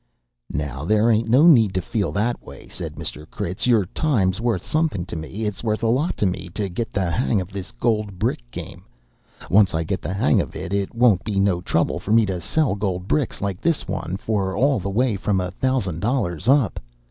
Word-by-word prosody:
"Now, 70 Hz, -2 st, -3 dB
there 110 Hz, +6 st, +3 dB
ain't 115 Hz, +1 st, +1 dB
no 130 Hz, +7 st, +6 dB
need 115 Hz, -, +6 dB
to -, -, +2 dB
feel 105 Hz, -5 st, -1 dB
that 115 Hz, +4 st, 0 dB
way," -, -, -12 dB
said -, -, -7 dB
Mr. 75 Hz, +1 st, -7 dB
Critz. 90 Hz, +7 st, -2 dB
"Your 115 Hz, -6 st, +4 dB
time's 100 Hz, -, 0 dB
wuth 115 Hz, -7 st, 0 dB
somethin' 155 Hz, -, 0 dB
to 90 Hz, -, -7 dB
me 90 Hz, +7 st, -5 dB
it's 105 Hz, 0 st, -4 dB
wuth 110 Hz, -1 st, -1 dB
a -, -, +3 dB
lot 140 Hz, +9 st, +1 dB
to -, -, +1 dB
me 90 Hz, -1 st, -2 dB
to 100 Hz, -3 st, -2 dB
get 110 Hz, +6 st, -4 dB
the 95 Hz, -4 st, -1 dB
hang 115 Hz, 0 st, +1 dB
of 90 Hz, -1 st, -5 dB
this 95 Hz, +1 st, -6 dB
gold 110 Hz, -5 st, -1 dB
brick 75 Hz, -, -1 dB
game. -, -, -8 dB, 0.7 s
Once 100 Hz, -3 st, +5 dB
I 80 Hz, -, 0 dB
get 95 Hz, +4 st, -3 dB
the 90 Hz, -, -3 dB
hang 100 Hz, -, +3 dB
of -, -, -7 dB
it, 85 Hz, -, -5 dB
it 100 Hz, +2 st, -1 dB
won't 115 Hz, -6 st, +4 dB
be 105 Hz, -4 st, -1 dB
no 95 Hz, -3 st, +2 dB
trouble -, -, 0 dB
for 105 Hz, -, -5 dB
me 115 Hz, -1 st, +5 dB
to 95 Hz, -3 st, -3 dB
sell 155 Hz, -, +1 dB
gold 95 Hz, -3 st, -2 dB
bricks 145 Hz, -1 st, 0 dB
like 100 Hz, -2 st, -3 dB
this 170 Hz, -2 st, 0 dB
one 95 Hz, -, -3 dB
for 100 Hz, -3 st, -1 dB
all 135 Hz, +1 st, +3 dB
the 100 Hz, +1 st, -4 dB
way 115 Hz, +1 st, +1 dB
from 95 Hz, 0 st, 0 dB
a 90 Hz, -1 st, -2 dB
thousand 100 Hz, -7 st, -1 dB
dollars 105 Hz, -, -1 dB
up. 135 Hz, -7 st, +3 dB
100 Hz, 220 wpm, -22 LUFS, 95-115 Hz, 0.7 s, no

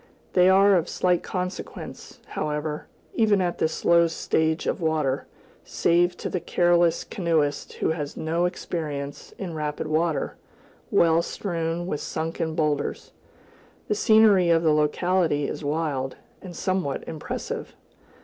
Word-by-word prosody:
[A] -, -, -32 dB
They 180 Hz, 0 st, +5 dB
are 195 Hz, +1 st, +6 dB
of 175 Hz, -2 st, +2 dB
slight 180 Hz, -1 st, +1 dB
consequence, 180 Hz, 0 st, -6 dB
however, 150 Hz, 0 st, -3 dB, 0.3 s
even 215 Hz, -3 st, +3 dB
at 175 Hz, -2 st, -1 dB
this 160 Hz, -, -1 dB
low 170 Hz, 0 st, +6 dB
stage 160 Hz, -1 st, 0 dB
of -, -, -1 dB
water, 155 Hz, -4 st, 0 dB, 0.4 s
save 175 Hz, +1 st, +2 dB
to -, -, -4 dB
the 180 Hz, -, -2 dB
careless 175 Hz, 0 st, +2 dB
canoeist 160 Hz, -6 st, -1 dB
who -, -, -1 dB
has 150 Hz, -3 st, -4 dB
had -, -, -6 dB
no 165 Hz, +2 st, +1 dB
experience 150 Hz, -5 st, -4 dB
in 180 Hz, -4 st, -5 dB
rapid 150 Hz, -1 st, -3 dB
water, 155 Hz, 0 st, 0 dB, 0.5 s
well 165 Hz, 0 st, +4 dB
strewn 170 Hz, -2 st, -3 dB
with 150 Hz, -5 st, -3 dB
sunken 160 Hz, 0 st, -3 dB
boulders. 150 Hz, -3 st, -1 dB, 0.8 s
The -, -, +3 dB
scenery 210 Hz, -4 st, +5 dB
of 165 Hz, 0 st, +4 dB
the 155 Hz, -2 st, +4 dB
locality 150 Hz, 0 st, +1 dB
is -, -, -5 dB
wild, 145 Hz, -3 st, -1 dB, 0.3 s
and 180 Hz, -2 st, -9 dB
somewhat 185 Hz, -6 st, -1 dB
impressive. 155 Hz, -, -5 dB
165 Hz, 140 wpm, -25 LUFS, 155-180 Hz, 0.8 s, are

